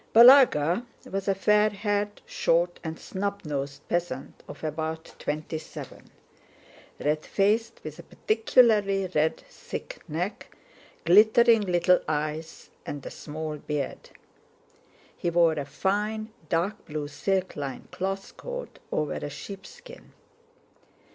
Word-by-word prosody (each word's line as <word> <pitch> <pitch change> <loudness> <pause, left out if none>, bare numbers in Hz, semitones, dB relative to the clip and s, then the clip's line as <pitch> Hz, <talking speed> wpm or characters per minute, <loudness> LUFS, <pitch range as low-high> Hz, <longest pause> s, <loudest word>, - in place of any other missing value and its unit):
Balagá 235 - +7 0.3
was 195 +1 -3
a 195 - +3
fair 210 +2 +4
haired, 205 0 -2
short, 175 +1 +1
and 160 0 -4
snub 200 +1 -4
nosed 140 -1 -4
peasant 170 -6 -3
of - - -10
about 160 +1 -4
twenty 155 +2 -3
seven; - - -10 0.9
red 150 +1 0
faced, 220 +4 +1
with 155 -1 -8
a - - -6
particularly 215 -4 +3
red 155 +1 +2
thick - - -8
neck, 175 +7 -4 0.5
glittering 220 +5 +6
little 180 -1 +3
eyes, 155 +1 -3
and 145 -1 -6
a - - -6
small 155 0 -5
beard. 145 -1 -4 1.1
He 175 - -1
wore 170 -1 +4
a 145 -3 -3
fine, 210 +8 -1 0.2
dark 180 +5 0
blue, 150 -1 -3
silk 190 +5 -1
lined 140 -3 -6
cloth 195 +1 -4
coat - - -7
over 150 -1 0
a 145 - -4
sheepskin. 480 - -10
180 Hz, 120 wpm, -27 LUFS, 155-210 Hz, 1.1 s, Balagá